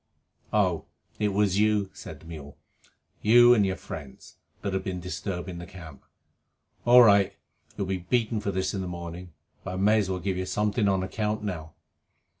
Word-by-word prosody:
"Oh, 95 Hz, -6 st, +1 dB, 0.3 s
it 105 Hz, -, +2 dB
was 100 Hz, -1 st, +1 dB
you," 105 Hz, -2 st, +2 dB
said -, -, -10 dB
the -, -, -16 dB
mule, 75 Hz, -3 st, -10 dB, 0.6 s
"you 120 Hz, +3 st, +7 dB
and 110 Hz, -4 st, +4 dB
your 95 Hz, -1 st, 0 dB
friends, 70 Hz, -7 st, -10 dB, 0.3 s
that 100 Hz, -, -2 dB
have 95 Hz, 0 st, -1 dB
been 95 Hz, -2 st, -3 dB
disturbing 90 Hz, 0 st, -5 dB
the 85 Hz, -, -8 dB
camp? 85 Hz, -8 st, -12 dB, 0.8 s
All 125 Hz, +1 st, +9 dB
right. 100 Hz, -3 st, +5 dB, 0.4 s
You'll 100 Hz, -, -1 dB
be 95 Hz, 0 st, -1 dB
beaten 110 Hz, +5 st, 0 dB
for 100 Hz, -, -3 dB
this 95 Hz, -1 st, -1 dB
in 95 Hz, -, -2 dB
the 95 Hz, -, -4 dB
morning. 85 Hz, 0 st, -7 dB, 0.3 s
But 90 Hz, -, -5 dB
I -, -, -4 dB
may 105 Hz, +3 st, +4 dB
as 100 Hz, -3 st, -1 dB
well 95 Hz, -, -1 dB
give 95 Hz, 0 st, -2 dB
you 95 Hz, 0 st, -3 dB
something 105 Hz, +2 st, +1 dB
on 95 Hz, -1 st, +1 dB
account 105 Hz, +2 st, -2 dB
now." 80 Hz, -6 st, -5 dB
95 Hz, 185 wpm, -27 LUFS, 90-105 Hz, 0.8 s, All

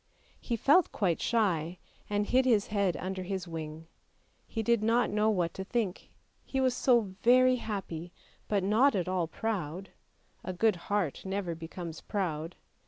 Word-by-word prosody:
He 235 Hz, -, -2 dB
felt 290 Hz, -, +4 dB
quite 180 Hz, -6 st, 0 dB
shy, 180 Hz, -7 st, +1 dB, 0.3 s
and 205 Hz, 0 st, +1 dB
hid 255 Hz, +4 st, +3 dB
his 225 Hz, -5 st, +3 dB
head 200 Hz, -4 st, 0 dB
under 190 Hz, 0 st, -4 dB
his 185 Hz, -1 st, -4 dB
wing; 160 Hz, -1 st, -6 dB, 0.6 s
he 225 Hz, -, -3 dB
did 235 Hz, 0 st, +2 dB
not 230 Hz, +2 st, +2 dB
know 210 Hz, +1 st, +2 dB
what 180 Hz, -6 st, 0 dB
to 190 Hz, -, -5 dB
think; 205 Hz, -2 st, -2 dB, 0.3 s
he 270 Hz, -, -3 dB
was 255 Hz, -1 st, +2 dB
so 250 Hz, -2 st, +4 dB, 0.2 s
very 255 Hz, +1 st, +5 dB
happy, 185 Hz, -7 st, -5 dB, 0.4 s
but 200 Hz, -3 st, +1 dB
not 225 Hz, +8 st, +4 dB
at 180 Hz, -3 st, -1 dB
all 185 Hz, -2 st, 0 dB
proud; 190 Hz, -1 st, -3 dB, 0.5 s
a 185 Hz, -, -4 dB
good 215 Hz, +3 st, +2 dB
heart 200 Hz, -8 st, 0 dB
never 190 Hz, -2 st, -2 dB
becomes 165 Hz, 0 st, -7 dB
proud. 170 Hz, -4 st, -3 dB
200 Hz, 160 wpm, -30 LUFS, 175-225 Hz, 0.6 s, very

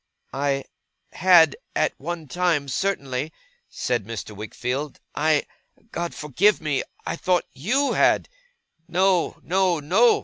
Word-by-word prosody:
'I 140 Hz, 0 st, 0 dB, 0.5 s
had, 170 Hz, -4 st, +6 dB, 0.2 s
at -, -, +2 dB
one 165 Hz, +1 st, -5 dB
time, 165 Hz, -2 st, +1 dB
certainly,' 140 Hz, -3 st, -2 dB, 0.4 s
said 120 Hz, -3 st, -1 dB
Mr. 105 Hz, -1 st, -7 dB
Wickfield. 125 Hz, +7 st, -4 dB
'I 155 Hz, 0 st, +2 dB, 0.5 s
God 170 Hz, 0 st, -3 dB
forgive 170 Hz, +9 st, +2 dB
me 155 Hz, -4 st, 0 dB, 0.2 s
I -, -, -2 dB
thought 180 Hz, 0 st, +1 dB
YOU 245 Hz, -, +1 dB
had.' -, -, +3 dB, 0.6 s
'No, 185 Hz, 0 st, +2 dB
no, 185 Hz, -2 st, +2 dB
no! 195 Hz, +11 st, +4 dB
155 Hz, 115 wpm, -24 LUFS, 135-180 Hz, 0.6 s, had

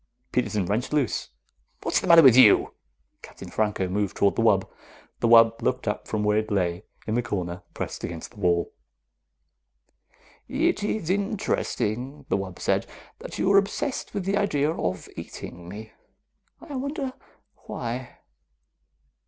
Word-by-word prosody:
Peterson 105 Hz, -3 st, 0 dB
wrenched 110 Hz, +10 st, -1 dB
loose. 140 Hz, -7 st, 0 dB, 0.5 s
"What's -, -, +2 dB
the -, -, -5 dB
matter 170 Hz, -1 st, +9 dB
with 130 Hz, -4 st, +8 dB
you?" 130 Hz, -, +6 dB, 0.5 s
Captain -, -, -11 dB
Franco 105 Hz, -3 st, 0 dB
moved 100 Hz, +1 st, -2 dB
toward 100 Hz, -, +3 dB
the -, -, +1 dB
wub. -, -, +3 dB, 0.5 s
The -, -, +1 dB
wub 115 Hz, 0 st, +6 dB
looked 130 Hz, -2 st, -1 dB
up 105 Hz, -, -2 dB
from 105 Hz, -1 st, -1 dB
where 105 Hz, 0 st, +3 dB
it 110 Hz, -, -4 dB
lay 90 Hz, -1 st, -1 dB, 0.2 s
in 110 Hz, -, -2 dB
the 120 Hz, -, +2 dB
corner, 90 Hz, -7 st, -4 dB
pressed -, -, -5 dB
against 85 Hz, -1 st, -6 dB
the 120 Hz, -, -20 dB
wall. 85 Hz, -3 st, +1 dB, 1.7 s
"It -, -, +1 dB
is 205 Hz, -5 st, -1 dB
interesting," 150 Hz, -, -2 dB
the -, -, +2 dB
wub 95 Hz, -2 st, -6 dB
said, -, -, 0 dB, 0.3 s
"that -, -, -8 dB
you 190 Hz, -, +2 dB
are 200 Hz, -, +8 dB
obsessed 210 Hz, +5 st, -3 dB
with 195 Hz, -3 st, -2 dB
the 195 Hz, +1 st, +1 dB
idea 155 Hz, -8 st, +1 dB
of 90 Hz, -, -3 dB
eating 85 Hz, 0 st, -8 dB
me. 110 Hz, +3 st, -9 dB, 0.7 s
I 290 Hz, -, -9 dB
wonder 275 Hz, 0 st, -3 dB, 0.5 s
why." 120 Hz, +1 st, -5 dB
115 Hz, 150 wpm, -25 LUFS, -, 1.7 s, matter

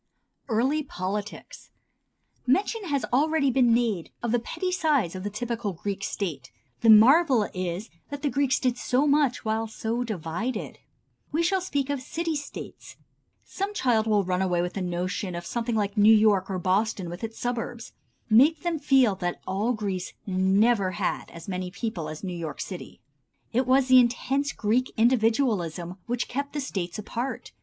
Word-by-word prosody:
Early 260 Hz, +7 st, +1 dB
Politics. 205 Hz, -5 st, -6 dB, 0.8 s
Mention 405 Hz, -, +1 dB
has 285 Hz, -5 st, -1 dB
already 290 Hz, 0 st, +3 dB
been 245 Hz, -2 st, +4 dB
made 230 Hz, -7 st, +1 dB
of 235 Hz, -, 0 dB
the 240 Hz, -, +3 dB
petty 365 Hz, +10 st, -3 dB
size 295 Hz, -, +1 dB
of 185 Hz, -1 st, -6 dB
the 205 Hz, -, -2 dB
typical 230 Hz, -1 st, -3 dB
Greek 195 Hz, +3 st, -4 dB
State. 170 Hz, -11 st, -4 dB, 0.3 s
The 230 Hz, -, +3 dB
marvel 245 Hz, +2 st, +6 dB
is 185 Hz, +3 st, -4 dB, 0.2 s
that 285 Hz, 0 st, -7 dB
the 290 Hz, -, +2 dB
Greeks 275 Hz, -2 st, +1 dB
did 250 Hz, -1 st, 0 dB
so 260 Hz, +3 st, +1 dB
much 285 Hz, -5 st, +2 dB
while 220 Hz, +1 st, 0 dB
so 225 Hz, +2 st, -2 dB
divided. 215 Hz, +3 st, -4 dB, 0.5 s
We 320 Hz, +3 st, +1 dB
shall 380 Hz, +2 st, +1 dB
speak 285 Hz, -6 st, -1 dB
of 280 Hz, -2 st, -2 dB
"city 325 Hz, +4 st, -3 dB
states." 290 Hz, -1 st, -8 dB, 0.5 s
Some 400 Hz, +2 st, -4 dB
child 230 Hz, -, +2 dB
will 210 Hz, -2 st, +3 dB
run 180 Hz, 0 st, -1 dB
away 175 Hz, -2 st, +1 dB
with 175 Hz, -, -4 dB
a 195 Hz, -, -2 dB
notion 180 Hz, +1 st, -3 dB
of 175 Hz, 0 st, -6 dB
something 235 Hz, +2 st, -2 dB
like 205 Hz, -1 st, -1 dB
New 215 Hz, +1 st, +7 dB
York 210 Hz, -3 st, +3 dB
or 190 Hz, -, -2 dB
Boston 190 Hz, +1 st, 0 dB
with 175 Hz, +4 st, -7 dB
its 225 Hz, 0 st, -5 dB
suburbs. 240 Hz, -1 st, -4 dB, 0.3 s
Make 270 Hz, +9 st, +5 dB
them 345 Hz, -3 st, -1 dB
feel 265 Hz, -7 st, +4 dB
that 175 Hz, -1 st, -3 dB
all 200 Hz, +6 st, 0 dB
Greece 195 Hz, -5 st, -3 dB
never 195 Hz, +1 st, +2 dB
had 200 Hz, -1 st, -2 dB
as 170 Hz, -1 st, -11 dB
many 185 Hz, -1 st, -3 dB
people 180 Hz, -5 st, -4 dB
as 155 Hz, +3 st, -8 dB
New 185 Hz, -2 st, -3 dB
York 165 Hz, -3 st, -5 dB
City. -, -, -7 dB, 0.5 s
It 255 Hz, +2 st, +1 dB
was 260 Hz, 0 st, +4 dB
the 255 Hz, 0 st, +8 dB
intense 265 Hz, +3 st, +1 dB
Greek 235 Hz, +4 st, 0 dB
individualism 220 Hz, -, +1 dB
which 245 Hz, 0 st, -1 dB
kept 280 Hz, +2 st, -4 dB
the 295 Hz, -, -2 dB
States 185 Hz, -10 st, -4 dB
apart. 235 Hz, +5 st, -5 dB
225 Hz, 170 wpm, -26 LUFS, 190-265 Hz, 0.8 s, the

